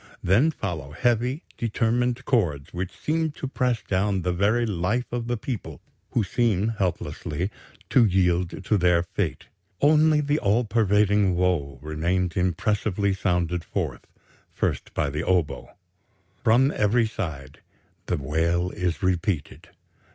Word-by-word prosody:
Then 115 Hz, -, +4 dB
follow 85 Hz, -, -5 dB
heavy, 125 Hz, -, 0 dB, 0.2 s
determined 120 Hz, +2 st, 0 dB
chords, 80 Hz, -, 0 dB
which 90 Hz, +1 st, -3 dB
seem 160 Hz, -, -1 dB
to 135 Hz, -, -5 dB
press 125 Hz, -3 st, 0 dB
down 95 Hz, -1 st, 0 dB
the 90 Hz, 0 st, 0 dB
very 105 Hz, +6 st, +2 dB
life 105 Hz, +5 st, -1 dB
of 120 Hz, -1 st, -3 dB
the 120 Hz, 0 st, -1 dB
people, 105 Hz, -, -5 dB, 0.3 s
who 115 Hz, -, +1 dB
seem 110 Hz, 0 st, +1 dB
helplessly... 95 Hz, -3 st, -2 dB, 0.4 s
to 125 Hz, -, +6 dB
yield 90 Hz, -1 st, +1 dB
to 105 Hz, -1 st, +2 dB
their 90 Hz, -1 st, +3 dB
fate. 85 Hz, -4 st, -3 dB, 0.3 s
Only 155 Hz, +1 st, +5 dB
the 145 Hz, +1 st, +1 dB
all 110 Hz, +3 st, +2 dB
pervading 105 Hz, -3 st, +2 dB
woe 85 Hz, -6 st, 0 dB
remains 85 Hz, +3 st, -1 dB
impressively 100 Hz, +2 st, 0 dB
sounded 90 Hz, -3 st, 0 dB
forth, -, -, -4 dB, 0.4 s
first -, -, -2 dB
by 70 Hz, -, 0 dB
the 75 Hz, +3 st, -2 dB
oboe.... 90 Hz, -4 st, -1 dB, 0.7 s
From 125 Hz, +5 st, +4 dB
every 110 Hz, +3 st, +3 dB
side 70 Hz, -, -6 dB, 0.5 s
the -, -, 0 dB
wail 85 Hz, +5 st, 0 dB
is 90 Hz, -5 st, -2 dB
repeated 90 Hz, -3 st, -1 dB
95 Hz, 130 wpm, -25 LUFS, 85-115 Hz, 0.7 s, to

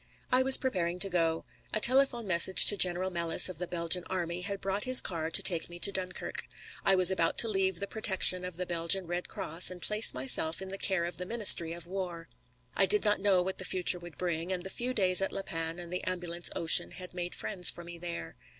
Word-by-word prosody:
I 255 Hz, +1 st, +2 dB
was 265 Hz, 0 st, +8 dB
preparing 180 Hz, -9 st, -5 dB
to 195 Hz, +2 st, -2 dB
go. 165 Hz, -2 st, -3 dB, 0.3 s
A -, -, -1 dB
telephone 250 Hz, 0 st, +3 dB
message 185 Hz, -1 st, +5 dB
to 205 Hz, -, +6 dB
General 185 Hz, 0 st, +2 dB
Melis, 170 Hz, 0 st, +4 dB
of 175 Hz, -3 st, -2 dB
the 180 Hz, -, -6 dB
Belgian 170 Hz, +1 st, 0 dB
Army, 175 Hz, -1 st, -6 dB
had 200 Hz, +1 st, -6 dB
brought 195 Hz, +2 st, -5 dB
his 255 Hz, 0 st, +8 dB
car 165 Hz, -2 st, -2 dB
to -, -, +1 dB
take 170 Hz, -2 st, 0 dB
me 175 Hz, -, -12 dB
to 200 Hz, +3 st, +3 dB
Dunkirk. 185 Hz, -1 st, -6 dB, 0.4 s
I 195 Hz, -, +1 dB
was 185 Hz, 0 st, +6 dB
about 170 Hz, -3 st, -3 dB
to 230 Hz, -, +5 dB
leave 190 Hz, -4 st, -3 dB
the 200 Hz, -, -5 dB
protection 190 Hz, -4 st, -2 dB
of 180 Hz, -2 st, -7 dB
the 180 Hz, -, -5 dB
Belgian 175 Hz, +2 st, 0 dB
Red 175 Hz, +1 st, -7 dB
Cross 165 Hz, +4 st, 0 dB
and 185 Hz, -1 st, -11 dB
place 210 Hz, +5 st, +3 dB
myself 135 Hz, +5 st, +2 dB
in 190 Hz, 0 st, -9 dB
the 195 Hz, +1 st, -9 dB
care 190 Hz, -3 st, -2 dB
of 175 Hz, -, -8 dB
the 180 Hz, -, -7 dB
ministry 205 Hz, -7 st, +5 dB
of 170 Hz, -1 st, -9 dB
war. 175 Hz, -2 st, -9 dB, 0.5 s
I -, -, 0 dB
did 420 Hz, -1 st, +4 dB
not 210 Hz, -1 st, -1 dB
know 190 Hz, -3 st, 0 dB
what 190 Hz, +1 st, -6 dB
the -, -, -4 dB
future 180 Hz, -1 st, -1 dB
would 175 Hz, -3 st, -15 dB
bring, 175 Hz, 0 st, -6 dB
and 180 Hz, -1 st, -5 dB
the 190 Hz, -, -7 dB
few 250 Hz, +4 st, -6 dB
days 185 Hz, -3 st, +2 dB
at 195 Hz, -, -3 dB
La 195 Hz, -, -7 dB
Panne 165 Hz, -2 st, -5 dB
and 175 Hz, 0 st, -10 dB
the 180 Hz, -, -6 dB
Ambulance 175 Hz, -1 st, -4 dB
Ocean 165 Hz, -, +3 dB
had 180 Hz, -1 st, -10 dB
made 175 Hz, 0 st, -7 dB
friends 180 Hz, -4 st, +1 dB
for 175 Hz, -, -8 dB
me 170 Hz, 0 st, -11 dB
there. 170 Hz, -, -9 dB
180 Hz, 235 wpm, -27 LUFS, 170-195 Hz, 0.5 s, was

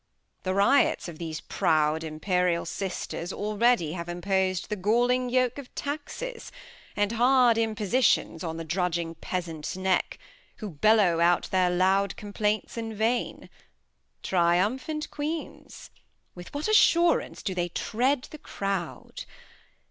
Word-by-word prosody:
The 185 Hz, 0 st, -2 dB
Riots 200 Hz, +5 st, +3 dB
of 165 Hz, -3 st, -9 dB
these 160 Hz, -2 st, -5 dB
proud 155 Hz, 0 st, +1 dB
imperial 170 Hz, +2 st, 0 dB
Sisters 180 Hz, 0 st, -4 dB
Already 210 Hz, -4 st, +1 dB
have 170 Hz, -1 st, -6 dB
impos'd 185 Hz, +1 st, -1 dB
the 210 Hz, -, -1 dB
galling 245 Hz, +5 st, +1 dB
Yoke 255 Hz, +1 st, +1 dB
Of 270 Hz, -, -12 dB
Taxes, 380 Hz, +12 st, -5 dB, 0.4 s
and 205 Hz, 0 st, +1 dB
hard 245 Hz, 0 st, +4 dB
Impossitions, 220 Hz, -5 st, +1 dB
on 160 Hz, -1 st, -4 dB
The 165 Hz, -, -4 dB
drudging 170 Hz, 0 st, -1 dB
Peasant's 170 Hz, -2 st, -5 dB
Neck, 185 Hz, -1 st, 0 dB, 0.4 s
who 210 Hz, -3 st, -7 dB
bellow 185 Hz, +1 st, +3 dB
out 175 Hz, +1 st, +2 dB
Their 185 Hz, -1 st, +3 dB
loud 190 Hz, +2 st, +2 dB
Complaints 210 Hz, +2 st, -2 dB
in 225 Hz, -1 st, -4 dB
vain 225 Hz, +3 st, -1 dB, 0.4 s
— -, -, -46 dB
Triumphant 205 Hz, -, 0 dB
Queens! 305 Hz, +2 st, -6 dB, 0.4 s
With 175 Hz, 0 st, -11 dB
what 290 Hz, +5 st, -3 dB
Assurance 345 Hz, -5 st, +3 dB
do 195 Hz, -, -2 dB
they 175 Hz, -1 st, -1 dB
treat 250 Hz, +9 st, 0 dB
the 305 Hz, -, -9 dB
Crowd. 195 Hz, -, -5 dB
200 Hz, 125 wpm, -27 LUFS, 175-245 Hz, 0.4 s, hard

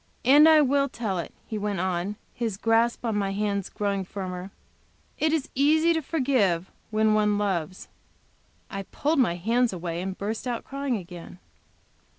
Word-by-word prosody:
"And 295 Hz, +5 st, +8 dB
I 310 Hz, -1 st, +7 dB
will 280 Hz, 0 st, +2 dB
tell 210 Hz, -7 st, -3 dB
it," 170 Hz, -, -5 dB
he 215 Hz, -2 st, -4 dB
went 205 Hz, -2 st, -2 dB
on, 185 Hz, +2 st, -1 dB, 0.2 s
his 225 Hz, -5 st, -3 dB
grasp 230 Hz, +3 st, +1 dB
on 225 Hz, -2 st, 0 dB
my 195 Hz, -1 st, 0 dB
hands 200 Hz, -1 st, -1 dB
growing 200 Hz, -2 st, -2 dB
firmer 185 Hz, -1 st, -6 dB, 0.7 s
"It 315 Hz, -, +2 dB
is 315 Hz, -4 st, 0 dB
easy 315 Hz, +5 st, +4 dB
to 320 Hz, -, 0 dB
forgive 250 Hz, -, +1 dB, 0.2 s
when 215 Hz, 0 st, +2 dB
one 210 Hz, -1 st, +2 dB
loves." 185 Hz, -4 st, -2 dB, 0.8 s
I 195 Hz, -, -5 dB
pulled 295 Hz, -, -1 dB
my 225 Hz, -9 st, +3 dB
hands 230 Hz, +7 st, +1 dB
away, 170 Hz, -2 st, -4 dB
and 190 Hz, 0 st, -4 dB
burst 215 Hz, +5 st, -4 dB
out 240 Hz, -2 st, -2 dB
crying 275 Hz, -3 st, -2 dB
again. 175 Hz, -2 st, -10 dB
210 Hz, 160 wpm, -26 LUFS, 190-260 Hz, 0.8 s, And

